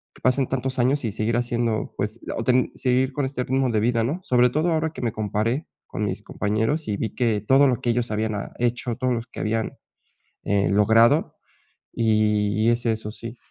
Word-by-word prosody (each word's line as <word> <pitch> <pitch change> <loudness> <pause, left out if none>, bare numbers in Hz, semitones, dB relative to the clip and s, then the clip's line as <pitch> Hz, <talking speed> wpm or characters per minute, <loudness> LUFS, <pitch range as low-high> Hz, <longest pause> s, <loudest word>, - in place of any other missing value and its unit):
que - - -18
pasen 130 +1 +2
tantos 130 0 -2
años 130 +3 +2
y 110 - -1
seguir 110 +3 -1
haciendo, 120 -2 -1
pues, 105 +3 -3 0.2
o 115 - -2
ten 125 +1 +2
o - - -14
seguir 130 +1 +1
con 145 -1 -1
este 130 -2 -3
ritmo 130 0 0
de 110 - +1
vida, 115 0 +1
¿no? 150 +10 -2
Sobre 125 0 +3
todo 160 +4 +1
ahora 160 0 0
que - - -7
me 115 - 0
comparé 110 - -2 0.2
con 105 - -3
mis 100 +1 -4
compañeros, 110 +9 -1
y 100 -1 -1
vi 110 - -4
que 115 -5 +1
todo 135 +5 +5
lo 125 -3 0
que 120 - +1
ellos 120 -1 -1
habían, 110 0 -1
ah, 100 - -5
hecho, 120 0 -1
todos 130 0 0
los 115 0 -3
que - - -10
habían, 110 +1 -1 0.7
eh, 100 -2 +1
logrado 115 +8 +4 0.6
y 105 -1 +1
y - - +6
es 120 +1 0
eso, 110 -1 -1
sí. 115 +1 -9
115 Hz, 215 wpm, -23 LUFS, 110-130 Hz, 0.7 s, y